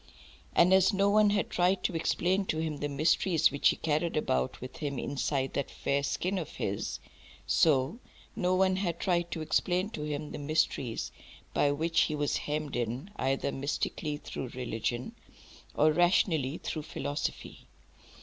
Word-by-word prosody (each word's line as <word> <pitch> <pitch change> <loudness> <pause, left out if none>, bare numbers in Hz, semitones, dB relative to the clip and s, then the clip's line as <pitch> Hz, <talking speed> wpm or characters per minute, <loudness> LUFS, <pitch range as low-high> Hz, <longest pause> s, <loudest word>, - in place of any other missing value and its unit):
And 180 +2 +6
as 190 0 +5
no 200 +1 +3
one 210 0 +5
had 205 -1 0
tried 180 +2 +2
to 180 - 0
explain 185 +4 +1
to 155 - -1
him 160 -2 -2
the 145 0 -3
mysteries 155 +3 +3
which 140 - +3
he - - +1
carried 155 +1 0
about 65 - 0
with 130 +1 -8
him 145 -3 -3
inside 135 0 -1
that 140 - -2
fair 140 0 -1
skin 185 +6 -1
of 160 - -7
his, 100 +1 -3 0.5
so 150 - +3 0.4
no 185 -4 +1
one 185 0 +3
had 175 -3 -2
tried 175 -2 +1
to 160 - -4
explain 180 +5 0
to 150 - -5
him 150 0 -4
the - - -6
mysteries 145 -5 -1 0.4
by 145 - +3
which 160 +3 +1
he 155 - +1
was 145 -1 0
hemmed 150 0 -3
in, 125 - -3
either 135 +1 0
mystically 145 +2 -2
through 135 - -6
religion, 120 0 -3 0.6
or 155 +1 +5
rationally 165 -4 +2
through 155 - -4
philosophy. 145 -1 -4
155 Hz, 160 wpm, -30 LUFS, 140-180 Hz, 0.6 s, And